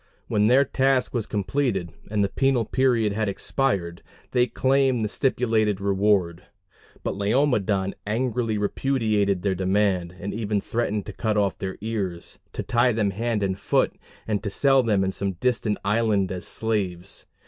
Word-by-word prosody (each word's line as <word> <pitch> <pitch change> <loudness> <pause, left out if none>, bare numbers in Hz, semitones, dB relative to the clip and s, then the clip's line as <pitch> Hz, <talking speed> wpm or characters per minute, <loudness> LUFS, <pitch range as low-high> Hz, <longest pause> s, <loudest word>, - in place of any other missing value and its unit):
When 105 0 +2
their 130 +4 +5
task 135 -1 +1
was 120 -4 -2
completed 105 - -1 0.2
and 105 -1 +1
the 100 - 0
penal 135 -2 +1
period 120 -4 +2
had 110 0 -1
expired, 95 -6 -1 0.3
they 125 0 +3
claimed 130 -1 +2
the - - 0
stipulated 110 -4 +1
reward; 100 -3 +1 0.6
but - - -1
Laomedon 100 -3 +1
angrily 115 0 0
repudiated 105 -4 0
their 100 -2 +1
demand, 95 -1 0
and 100 - -4
even 105 -2 -1
threatened 105 -1 -2
to - - -7
cut 110 -2 -1
off 100 -2 +1
their 95 0 -4
ears, 100 -6 -4
to - - -4
tie 120 +1 +2
them 105 -3 +1
hand 110 +1 -1
and 95 -1 -1
foot, - - +1 0.3
and 105 -2 0
to 100 - -3
sell 135 +5 +4
them 105 -5 +1
in 95 - 0
some 100 0 -3
distant 115 +1 0
island 105 -2 +1
as 90 -1 -4
slaves. 100 -5 -2
105 Hz, 160 wpm, -24 LUFS, 100-120 Hz, 0.6 s, their